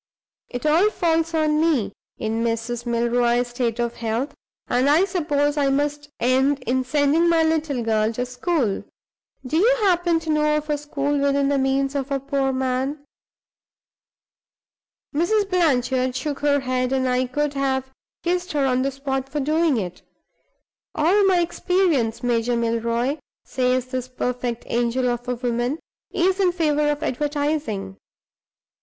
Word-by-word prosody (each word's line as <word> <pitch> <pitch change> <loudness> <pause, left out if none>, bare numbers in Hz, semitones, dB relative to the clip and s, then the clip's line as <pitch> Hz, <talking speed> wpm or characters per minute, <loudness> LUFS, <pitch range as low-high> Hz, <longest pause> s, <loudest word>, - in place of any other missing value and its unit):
It 245 +3 -6
all 330 +7 +4
falls 330 -4 0
on 305 -1 +2
me, 265 -12 +1 0.2
in 225 +1 -2
Mrs. 235 +1 -2
Milroy's 240 +1 +1
state 240 -1 -2
of 235 0 -2
health, 230 +5 -2 0.3
and 255 +3 +2
I 320 +6 +5
suppose 300 -6 0
I 280 -1 +2
must 290 +1 -1
end 265 +3 +2
in 255 +2 +1
sending 295 +5 +2
my 330 -1 +4
little 315 -6 0
girl 220 -1 +1
to 245 +2 -2
school. 250 - -1 0.6
Do 300 +5 -1
you 480 +8 +4
happen 350 -3 +3
to 320 -1 -2
know 300 0 +2
of 300 0 -3
a 295 - 0
school 290 -1 -1
within 280 0 +2
the 280 -1 +2
means 270 +1 +1
of 280 -1 -3
a 275 -1 0
poor 275 0 -1
man?' 265 +3 -2 2.1
Mrs. 395 +7 +1
Blanchard 260 -7 +1
shook 290 +1 -3
her 285 -1 +2
head; 255 -1 -1
I 255 -1 +1
could 295 +3 -1
have 265 -1 -1 0.3
kissed 355 0 -1
her 285 -2 +1
on 255 -1 +2
the 270 - +1
spot 270 -1 -3
for 295 - -3
doing 310 0 +2
it. 180 -4 -4 0.9
'All 360 +7 +3
my 370 -2 +4
experience, 340 - 0
Major 240 0 +1
Milroy,' 235 +4 0 0.3
says 255 -1 0
this 255 -1 -4
perfect 250 -2 -3
angel 240 +2 0
of 240 0 -3
a 250 - -1
woman, 240 +3 -1 0.3
'is 375 +2 +1
in 370 -2 +3
favor 300 -4 +1
of 295 +1 -2
advertising. 285 -9 -2
275 Hz, 150 wpm, -23 LUFS, 245-305 Hz, 2.1 s, I